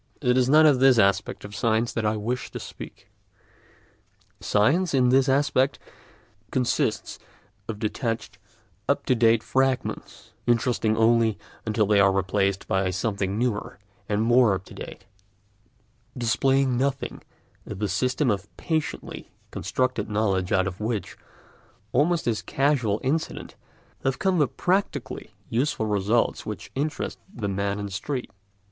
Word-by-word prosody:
It 125 -3 +2
is 130 0 +3
not 155 +2 +7
of 145 -4 +5
this 130 -2 +6
aspect 100 -1 +1
of 100 0 -9
science 115 +1 +1
that 110 -2 0
I 110 +1 0
wish 120 +4 -3
to - - -7
speak. - - -10 1.3
Science, 145 - +2
in 125 -2 +4
this 135 +1 +4
aspect, 135 0 +2 0.7
consists 125 -2 -1 0.5
of 110 - -4
detached 115 +2 -3 0.5
up - - +1
to - - +3
date 115 -2 +3
fragments, 130 -1 -1 0.2
interesting 115 -2 +2
only 115 -1 +3 0.3
until 110 0 +2
they 105 0 +3
are 100 0 +5
replaced 95 0 0
by 95 -1 +1
something 100 +1 -2
newer 120 -3 -2 0.3
and 105 +1 +1
more 120 -3 +4
up 95 - -7
to - - -13
date, - - -9 1.1
displaying 125 +2 +2
nothing 135 0 -2 0.5
of 105 - -6
the 105 +1 -1
systems 125 - +1
of 100 0 -8
patiently 160 -3 -3 0.2
constructed 130 -5 -1
knowledge 100 -3 0
out 95 -2 +3
of 95 -1 -5
which, 110 -4 -3 0.8
almost 170 +2 +2
as 115 -3 0
a - - -10
casual 130 -7 +1
incident, 155 +5 -2 0.5
have 135 0 0
come 190 -3 +1
the 145 - +4
practically 190 +8 -2
useful 120 -1 0
results 105 +2 +1
which - - -7
interest 150 +3 -3
the 110 -4 -4
man 100 +1 -1
in 105 - -4
the 100 - -7
street. 125 +6 -4
115 Hz, 140 wpm, -25 LUFS, 105-130 Hz, 1.3 s, not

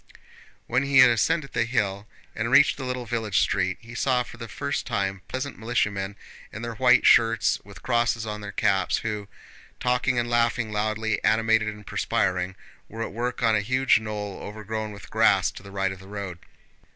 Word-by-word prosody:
When 125 +2 +1
he 140 0 +1
had 130 -2 +9
ascended 145 +4 0
the - - +2
hill 105 -4 -1 0.3
and 115 +2 -2
reached 135 +4 +6
the 135 - -5
little 125 -1 -3
village 110 -5 -1
street, 95 -1 +1
he 115 +1 -12
saw 125 0 +1
for 120 - -12
the 115 -1 -7
first 70 -9 -3
time 95 -1 -2
peasant 130 +1 -5
militiamen 100 -4 -1 0.4
in 110 - -7
their 120 0 -4
white 125 +2 +4
shirts 115 -2 +4
and - - -27
with 100 -2 -13
crosses 120 -2 +1
on 105 -1 -5
their 105 0 -6
caps, 95 -2 +1
who, 105 -2 -3 0.5
talking 125 0 +1
and 120 0 +1
laughing 115 -1 +1
loudly, 110 +1 -1
animated 110 0 +3
and 105 -1 -6
perspiring, 90 0 -1 0.3
were 115 +1 -5
at - - -6
work 125 +2 -3
on 115 -1 +4
a 105 - +2
huge 130 +4 +3
knoll 105 -2 -5
overgrown 110 +1 -5
with 100 -2 -12
grass - - +3
to - - -11
the 100 - -12
right 95 -1 -1
of 95 - -8
the 95 - -14
road. 100 -4 -6
110 Hz, 190 wpm, -25 LUFS, 100-120 Hz, 0.5 s, had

